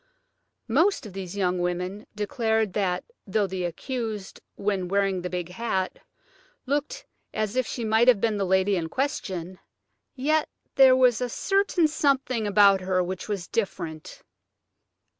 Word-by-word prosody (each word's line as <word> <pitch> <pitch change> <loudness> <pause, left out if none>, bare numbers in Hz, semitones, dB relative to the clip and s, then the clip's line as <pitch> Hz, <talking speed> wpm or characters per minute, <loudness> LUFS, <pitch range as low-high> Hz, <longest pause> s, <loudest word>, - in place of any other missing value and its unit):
Most 310 - +2
of 205 - -9
these 190 0 -6
young 180 -2 +1
women 180 +3 -3
declared 220 -1 0
that 185 -3 0 0.2
though 205 +1 +1
the 190 -2 -3
accused, 220 +1 -5
when 195 -3 -1
wearing 195 -1 +1
the 180 - -4
big 180 -1 -4
hat, 190 -1 -2 0.7
looked 285 +2 -2 0.3
as 215 0 -1
if 255 -3 +1
she 230 +3 -4
might 220 +2 +3
have 245 -5 +6
been 220 0 +1
the 200 - 0
lady 190 +2 +2
in 165 -3 -2
question, 190 - -3 0.6
yet 300 +4 +1 0.2
there 265 -1 +7
was 250 -2 +4
a 250 - -1
certain 390 - +2
something 270 -7 0
about 200 -1 +5
her 185 0 +1
which 185 +3 -5
was 195 -5 -3
different. 165 -7 -4
205 Hz, 145 wpm, -26 LUFS, 185-250 Hz, 0.7 s, there